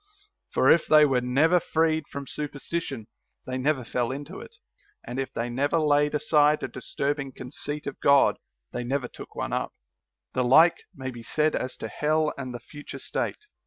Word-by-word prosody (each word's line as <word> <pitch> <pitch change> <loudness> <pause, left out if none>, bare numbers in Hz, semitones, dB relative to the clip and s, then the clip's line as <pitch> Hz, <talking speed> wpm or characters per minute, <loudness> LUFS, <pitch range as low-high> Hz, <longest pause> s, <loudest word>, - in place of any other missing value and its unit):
For - - +4
if 170 - +4
they 155 -1 +7
were 130 -3 +2
never 145 +8 +3
freed 160 -2 +1
from 140 0 -6
superstition, 145 -3 -4 0.4
they 130 0 -3
never 135 0 +1
fell 120 0 -1
into 145 +7 -6
it; 460 - -12 0.5
and. 125 - -5
if 135 - -3
they 115 - -3
never 140 +6 0
laid 150 -1 +3
aside 150 0 +3
a - - -1
disturbing 140 +3 -3
conceit 145 +4 -6
of 140 - -6
God, 140 -1 +5 0.3
they 125 - -3
never 130 +1 -1
took - - -12
one - - -3
up. - - -2 0.6
The 125 - +1
like 160 +8 +6
may 130 -1 -5
be 120 -2 -9
said 155 +6 +1
as 130 0 -3
to - - -5
hell 155 0 0
and 130 -2 -6
the 120 - -6
future 145 +5 -10
state. 425 - -3
145 Hz, 180 wpm, -26 LUFS, 130-150 Hz, 0.6 s, they